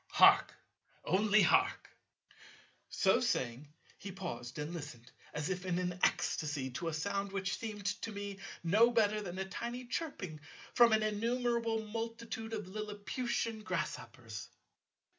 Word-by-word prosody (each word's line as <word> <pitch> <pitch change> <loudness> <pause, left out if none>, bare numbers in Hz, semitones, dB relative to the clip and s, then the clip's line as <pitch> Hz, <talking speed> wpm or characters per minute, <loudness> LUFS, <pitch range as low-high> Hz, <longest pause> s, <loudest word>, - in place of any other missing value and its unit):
Hark, - - +7 0.5
only 205 +4 +4
hark!" - - +3 1.0
So - - +3
saying 130 +4 -1 0.3
he 195 - -6
paused 155 -11 -6
and 150 +3 -3
listened, 145 -7 -8 0.2
as 150 +4 -2
if 180 -1 -3
in 180 -2 0
an 180 0 -2
ecstasy, 145 -4 +1
to 150 +7 -4
a 165 - -1
sound 200 +4 -1
which 195 -1 -2
seemed 210 -3 -5 0.2
to 225 - -3
me 200 -1 -5 0.2
no 210 +8 +6
better 215 -3 +3
than 185 -3 -6
a 190 - -1
tiny 240 +5 -5
chirping 220 - -4 0.3
from 235 -1 +7
an 220 0 +4
innumerable 230 +1 0
multitude 225 0 -5
of 210 -4 -3
lilliputian 215 +3 -3
grasshoppers. - - -4
200 Hz, 135 wpm, -34 LUFS, 175-225 Hz, 1.0 s, Hark